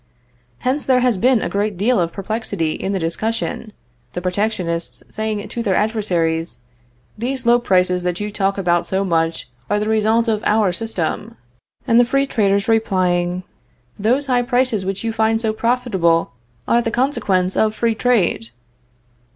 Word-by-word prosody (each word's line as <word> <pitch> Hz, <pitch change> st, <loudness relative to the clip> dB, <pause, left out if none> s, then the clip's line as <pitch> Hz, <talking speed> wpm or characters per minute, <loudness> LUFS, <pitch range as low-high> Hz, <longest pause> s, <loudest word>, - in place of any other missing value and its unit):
Hence 270 Hz, +3 st, 0 dB
there 255 Hz, -1 st, +4 dB
has 250 Hz, -2 st, +2 dB
been 245 Hz, 0 st, +3 dB
a 205 Hz, +2 st, 0 dB
deal 210 Hz, +4 st, +1 dB
of 170 Hz, -1 st, 0 dB
perplexity 200 Hz, -5 st, -2 dB
in 190 Hz, -, -3 dB
the 195 Hz, -, 0 dB
discussion, 215 Hz, +6 st, -2 dB, 0.4 s
the -, -, -3 dB
protectionists 180 Hz, -3 st, -2 dB
saying 215 Hz, -1 st, -3 dB
to 235 Hz, -, -4 dB
their 200 Hz, -5 st, +1 dB
adversaries: 170 Hz, -, 0 dB, 0.6 s
"These 255 Hz, +2 st, -2 dB
low 240 Hz, +1 st, +5 dB
prices 180 Hz, -4 st, +2 dB
that 180 Hz, 0 st, -2 dB
you 210 Hz, 0 st, -3 dB
talk 195 Hz, -1 st, 0 dB
about 175 Hz, -3 st, +1 dB
so 190 Hz, +1 st, 0 dB
much 165 Hz, -4 st, 0 dB, 0.2 s
are 205 Hz, -, +1 dB
the 210 Hz, -, -2 dB
result 220 Hz, +2 st, +2 dB
of 215 Hz, -2 st, 0 dB
our 210 Hz, -3 st, +2 dB
system;" 220 Hz, +2 st, -3 dB, 0.5 s
and 230 Hz, -1 st, +5 dB
the -, -, +7 dB
free 275 Hz, +3 st, +1 dB
traders 200 Hz, -6 st, +1 dB
replying: 185 Hz, -5 st, +1 dB, 0.6 s
"Those 250 Hz, +8 st, +1 dB
high 250 Hz, -2 st, +2 dB
prices 245 Hz, -5 st, 0 dB
which 195 Hz, +2 st, -3 dB
you 225 Hz, -1 st, -2 dB
find 225 Hz, 0 st, +2 dB
so 220 Hz, -1 st, -1 dB
profitable 220 Hz, -8 st, +1 dB, 0.4 s
are 235 Hz, -, +3 dB
the 230 Hz, -, -1 dB
consequence 215 Hz, -8 st, 0 dB
of 215 Hz, 0 st, +2 dB
free 230 Hz, -1 st, +1 dB
trade." 215 Hz, -, +1 dB
215 Hz, 160 wpm, -19 LUFS, 185-230 Hz, 0.6 s, the